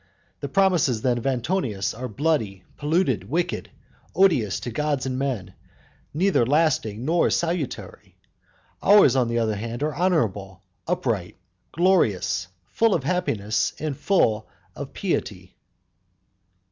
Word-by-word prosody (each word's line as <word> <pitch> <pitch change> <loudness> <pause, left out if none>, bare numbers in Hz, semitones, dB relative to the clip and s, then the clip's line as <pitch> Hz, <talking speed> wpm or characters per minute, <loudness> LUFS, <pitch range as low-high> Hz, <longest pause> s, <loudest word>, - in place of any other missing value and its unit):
The 140 - -5
promises 170 - +2
then 125 -2 +1
of 120 - -4
Antonius 125 - -1
are 125 +2 -5
bloody, 110 -7 -1
polluted, 165 +6 0
wicked, 175 +2 -2 0.5
odious 155 - +3
to 120 - -5
gods 145 +1 -1
and 130 -1 -2
men, 130 -8 -3 0.6
neither 180 -3 +2
lasting 130 -5 +1
nor 165 +3 +2
salutary; 170 -5 -3 0.6
ours, 205 -7 +6
on 125 -2 +2
the 115 0 -1
other 110 -2 +1
hand, 115 +5 -4
are 150 0 -1
honourable, 105 - -1 0.2
upright, - - -2 0.3
glorious, 100 - +2 0.2
full 225 - +2
of 150 - -2
happiness, 115 - 0
and 155 -3 -3
full 110 - +1 0.3
of 140 - -7
piety. 95 - -3
135 Hz, 120 wpm, -24 LUFS, 110-170 Hz, 0.6 s, ours